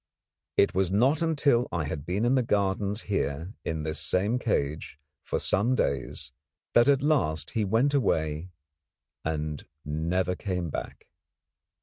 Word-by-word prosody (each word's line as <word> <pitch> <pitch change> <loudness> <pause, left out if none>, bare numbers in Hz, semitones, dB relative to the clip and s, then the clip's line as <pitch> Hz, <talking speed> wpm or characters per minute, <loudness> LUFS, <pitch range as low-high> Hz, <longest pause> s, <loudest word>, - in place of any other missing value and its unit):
It 100 - +4
was 95 -1 +1
not 130 - +3
until 145 -7 +3
I 85 -2 -1
had 75 0 -5
been 100 +6 0
in 120 - +3
the 130 - +4
gardens 100 -1 0
here, 85 -2 -2
in 80 -2 -3
this 80 -1 -2
same 100 +9 +1
cage, 75 - -1 0.2
for - - -2
some 120 +6 +1
days 70 - -2 0.4
that 120 +2 +6
at 140 -1 +4
last 80 - +1
he 110 - 0
went 115 +8 +2
away 80 - 0 0.7
and 75 -2 -3 0.2
never 85 +5 0
came 90 -4 -3
back. - - -6
95 Hz, 140 wpm, -28 LUFS, 80-120 Hz, 0.7 s, that